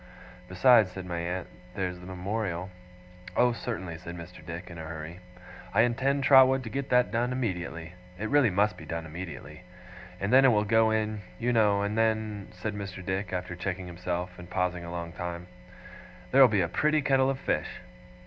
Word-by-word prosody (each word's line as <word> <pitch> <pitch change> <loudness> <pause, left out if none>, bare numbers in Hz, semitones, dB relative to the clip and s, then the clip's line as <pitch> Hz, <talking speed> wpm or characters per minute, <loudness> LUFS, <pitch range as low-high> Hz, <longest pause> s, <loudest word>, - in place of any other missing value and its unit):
'Besides,' 105 +3 +5
said 95 -1 -7
my 85 -1 -3
aunt, 90 +2 -3 0.3
'there's 90 -2 -3
the 90 - -11
Memorial 95 -1 -3 0.3
' 90 0 -15
'Oh, 125 0 +5
certainly,' 95 -9 -5
said 85 0 -8
Mr. 85 0 -10
Dick, 85 +2 -7
in 85 - -9
a - - -6
hurry, 80 +2 -7 0.6
'I - - +6
intend, 135 +4 +1
Trotwood, 130 -1 +6
to 110 - -7
get 135 +3 -3
that 125 0 +3
done 120 +2 0
immediately 90 -8 -3 0.2
it 110 +4 -3
really 145 -1 +4
must 100 +3 +1
be - - -10
done 85 -1 -4
immediately! 80 -1 -8 0.6
And 100 +5 -1
then 135 +1 +8
it - - +7
will 105 -4 +4
go 110 +1 +4
in, 110 -1 -1 0.2
you 120 +1 0
know 105 -3 +3
and 100 +1 -1
then 110 -2 0
' - - -17
said 105 +3 -3
Mr. 95 -3 -7
Dick, 95 +1 -2
after 90 -1 -3
checking 90 +1 -4
himself, 90 0 -4
and 90 0 -10
pausing 90 -1 -1
a 85 - -7
long 85 -1 -5
time, 85 -1 -5 0.9
'there'll 135 0 +8
be 105 -4 +2
a 85 - +1
pretty 150 - +1
kettle 135 -1 +3
of 135 - -1
fish! - - -1
95 Hz, 195 wpm, -28 LUFS, 90-115 Hz, 0.9 s, then